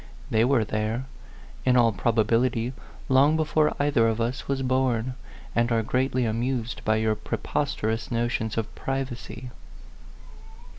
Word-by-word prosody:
They 110 0 +4
were 125 -2 +3
there, 110 +4 -2 0.6
in 125 -1 +4
all 115 -2 +5
probability, 115 +3 +1 0.3
long 140 +4 +4
before 155 -1 +2
either 145 -5 +3
of 115 0 0
us 120 +3 -2
was 135 -1 -1
born, 130 -2 +1 0.4
and 120 +1 +2
are 115 -1 +2
greatly 130 +2 0
amused 120 +1 -2
by 110 - +2
your 110 0 +2
pre 110 - -4
posterous 115 -6 -2
notions 115 -2 -1
of 115 - -2
privacy." 130 -2 -5
120 Hz, 135 wpm, -26 LUFS, 115-130 Hz, 0.6 s, all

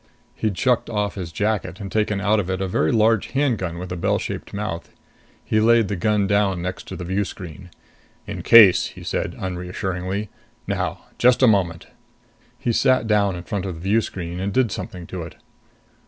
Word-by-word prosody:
He'd 105 -4 -2
shucked 125 -2 +1
off 105 -2 -1
his 90 -4 -6
jacket 100 -2 -1
and 100 -2 -6
taken 105 -2 0
out 105 +2 +2
of 95 -3 -3
it 95 0 -1
a 95 - -1
very 80 -4 +1
large 110 -1 +3
handgun 115 -12 0
with 90 +1 -6
a - - -2
bell 85 - +1
shaped - - -5
mouth. 95 -5 -4 0.6
He 110 - +2
laid 115 -1 +4
the 100 - -1
gun 105 +2 +1
down 100 -2 +1
next 90 +1 -5
to - - -6
the 90 - -6
view 95 +3 0
screen. 90 -1 -9 0.6
"In - - -5
case," 110 -6 +7
he - - -11
said, - - -2
unreassuringly. 95 +2 -3 0.4
"Now - - -2 0.2
just 125 +2 +4
a - - +8
moment." 90 -6 +1 0.7
He 120 - -1
sat 130 0 +3
down 105 -3 +2
in 90 - -7
front 100 0 -3
of 90 - -4
the 80 - -10
view 105 +5 +2
screen 90 -3 -5
and 95 +2 -2
did 120 0 +2
something 90 -2 -6
to 90 +1 -6
it. 80 - -8
100 Hz, 195 wpm, -22 LUFS, 90-110 Hz, 0.7 s, a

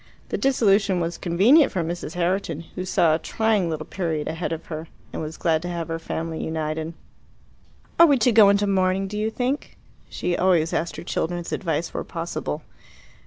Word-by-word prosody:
The - - -1
disillusion 200 -7 +3
was 170 0 -3
convenient 220 - +5
for 180 - -1
Mrs. 170 0 -5
Herriton, 175 -2 -1
who 185 - -4
saw 170 -3 +3
a 160 - +1
trying 215 -1 +1
little 155 -1 -3
period 160 -5 -2
ahead 165 +1 -3
of 165 -1 -4
her, 160 0 -6 0.3
and - - -4
was 155 +1 -6
glad 160 -2 +1
to 175 - -5
have 170 -1 -4
her 165 0 -2
family 160 0 -4
united. 160 0 -3 1.0
"Are 335 - +9
we 285 -3 +4
to 245 +1 +3
go 215 -3 +7
into 200 +1 +3
mourning, 190 0 +1
do 210 - -7
you 215 +1 0
think?" 255 +5 -3 0.3
She 175 0 -2
always 175 -3 +2
asked 165 +1 -1
her - - -7
children's 175 0 -3
advice 165 -2 -2
where - - -3
possible. 165 -2 -4
175 Hz, 185 wpm, -24 LUFS, 165-200 Hz, 1.0 s, Are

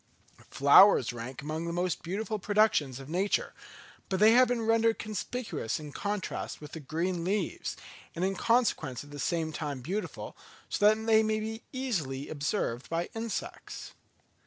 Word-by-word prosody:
Flowers 140 - +6
rank 120 +3 -7
among 155 +2 -3
the 170 - -2
most 175 +1 -1
beautiful 210 +5 -3
productions 200 - +2
of 135 - -10
nature; 185 +6 0 0.6
but 190 -1 0
they 215 +2 +7
have 250 +2 +6
been 240 -1 -1
rendered 225 0 +3
conspicuous 215 - -3
in 150 -1 -8
contrast 205 +4 -3
with 150 - -10
the 160 - -6
green 165 +4 -2
leaves, 190 0 -2 0.4
and 175 +2 0
in 195 - 0
consequence 195 - +1
at 145 - -14
the 145 - -8
same 160 +1 -1
time 145 -4 -4
beautiful, 165 - -4 0.3
so 205 - +3
that 215 +1 +3
they 220 -1 +5
may 215 0 0
be 220 +1 -5
easily 165 - -3
observed 140 - -2
by 165 +1 -1
insects. 225 -1 -5
185 Hz, 160 wpm, -30 LUFS, 150-215 Hz, 0.6 s, they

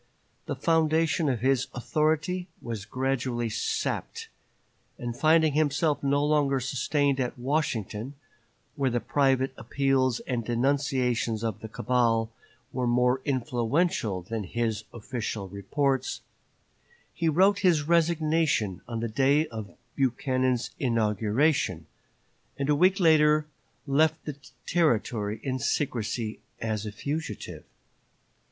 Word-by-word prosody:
The - - -2
foundation 160 -1 +2
of 120 -5 -1
his 130 0 +2
authority 155 +7 0
was 110 -4 -6
gradually 125 -1 -1
sapped; 110 - -3 0.7
and 120 -1 -4
finding 155 +2 +4
himself 150 0 +1
no 140 +1 +2
longer 145 -3 +2
sustained 135 +2 0
at 125 -1 -2
Washington, 125 - -2 0.6
where 140 -3 +1
the 120 0 0
private 135 +2 +1
appeals 135 -3 +1
and 120 -3 -2
denunciations 125 -2 0
of 110 -3 -2
the 110 - -7
cabal 115 -1 +1 0.4
were 125 -1 -1
more 125 +2 +2
influential 125 - 0
than 110 +3 -4
his 110 +1 -2
official 115 -3 -4
reports, 130 +7 -1 0.9
he 165 -1 0
wrote 190 +6 +4
his 175 -7 +3
resignation 160 - +1
on 115 -2 -4
the 115 - -1
day 140 +7 +3
of 110 -3 -8 0.2
Buchanan's 130 -1 0
inauguration, 110 - +1 0.7
and 140 +1 -2
a 150 - +4
week 185 +6 +4
later 155 -3 +5 0.4
left 155 +3 +2
the 150 - -4 0.3
Territory 115 - +1
in 130 -2 -2
secrecy 115 -4 -2 0.2
as 110 -1 -2
a - - -4
fugitive. 145 +9 -5
130 Hz, 115 wpm, -27 LUFS, 115-150 Hz, 0.9 s, later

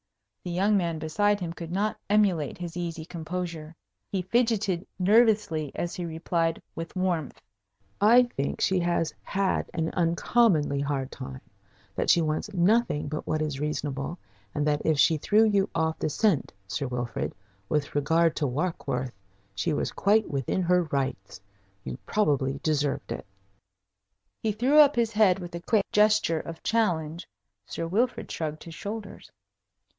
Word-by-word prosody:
The - - -5
young 195 +4 +2
man 170 -4 0
beside 205 +7 +1
him 170 -3 -4
could 170 -1 -8
not 205 +4 -1
emulate 195 -8 +2
his 175 -2 -6
easy 170 -2 -4
composure. 165 -1 -5 0.4
He 190 -2 -1
fidgeted 205 -3 +1
nervously 205 - +3
as 175 - -3
he 180 - -4
replied, 165 0 -1
with 165 +2 -7
warmth: 180 -5 -1 0.6
"I 235 +4 +7
think 140 - -3
she 190 -1 +2
has 170 -2 0
had 195 -1 -1
an 160 -1 -1
uncommonly 170 -3 +2
hard 140 -2 -2
time, 65 -1 -8 0.5
that - - -1
she 170 - +6
wants 155 +6 -2
nothing 195 -4 +2
but 155 +1 -5
what 155 0 0
is 145 -3 -3
reasonable, 150 +1 -3 0.4
and 145 - 0
that 150 -1 +1
if 160 -2 +2
she 160 +2 +4
threw 210 +8 +3
you 200 -3 +2
off 160 -1 0
the - - 0
scent, 185 -1 +1 0.2
Sir 135 +8 -2
Wilfrid, 125 -1 -3 0.3
with 150 -2 -1
regard 160 +3 +2
to 145 - +1
Warkworth, 130 -3 -2 0.4
she 100 - -1
was - - -1
quite 215 +2 +2
within 140 +6 -1
her 180 +1 +3
rights. 135 -10 -3 0.4
You 65 -1 -6
probably 140 -9 +1
deserved 145 -3 0
it." - - -5 1.1
He 220 - +1
threw 255 +8 +3
up 290 -1 +7
his 230 -2 +1
head 210 -4 +4
with 175 -2 -8
a 170 - -4
quick 205 +2 +2
gesture 210 -6 +3
of 165 +1 -8
challenge. 170 -7 0 0.4
Sir 165 - -4
Wilfrid 230 +8 0
shrugged 155 -1 -4
his 165 - -9
shoulders. 205 +4 -7
170 Hz, 155 wpm, -27 LUFS, 150-205 Hz, 1.1 s, I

